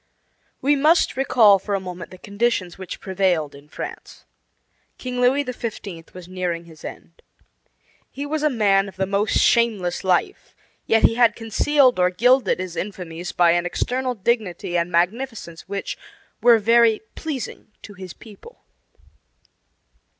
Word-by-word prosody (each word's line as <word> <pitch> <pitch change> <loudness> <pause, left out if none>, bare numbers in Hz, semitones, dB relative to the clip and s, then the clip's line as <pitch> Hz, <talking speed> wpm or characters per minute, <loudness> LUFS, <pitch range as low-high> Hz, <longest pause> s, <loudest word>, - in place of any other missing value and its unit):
We 290 +2 +4
must 310 +5 +3
recall 225 -6 +5
for 200 +1 -3
a - - -1
moment 180 -2 -8
the 185 - -12
conditions 200 -3 -1
which 190 -2 -8
prevailed 180 -6 0
in 140 +1 -15
France. - - -9 0.7
King 250 -1 -4
Louis 265 +3 +3
XV. 210 - -7
was 180 -1 -10
nearing 180 -2 -3
his 160 -2 -16
end. 165 - -10 0.9
He 280 +2 -6
was 305 +1 -2
a 305 - +3
man 200 -5 +2
of - - -15
the 190 0 -1
most 200 +2 0
shameless 215 -7 +2
life; 185 - -1 0.3
yet 225 0 +3
he - - +5
had 235 0 +3
concealed 250 +2 +2
or 180 0 +4
gilded 245 +4 +3
his 185 -2 -5
infamies 180 -3 -5
by 175 -1 +4
an 175 +1 +1
external 255 +6 -2
dignity 200 -5 -2
and 170 0 0
magnificence 180 0 -1
which, 200 0 -4 0.4
were 240 -1 +6
very 230 0 +4
pleasing 295 -6 -6 0.2
to 205 - -10
his 185 -2 -9
people. 230 - -15
200 Hz, 145 wpm, -22 LUFS, 180-245 Hz, 0.9 s, were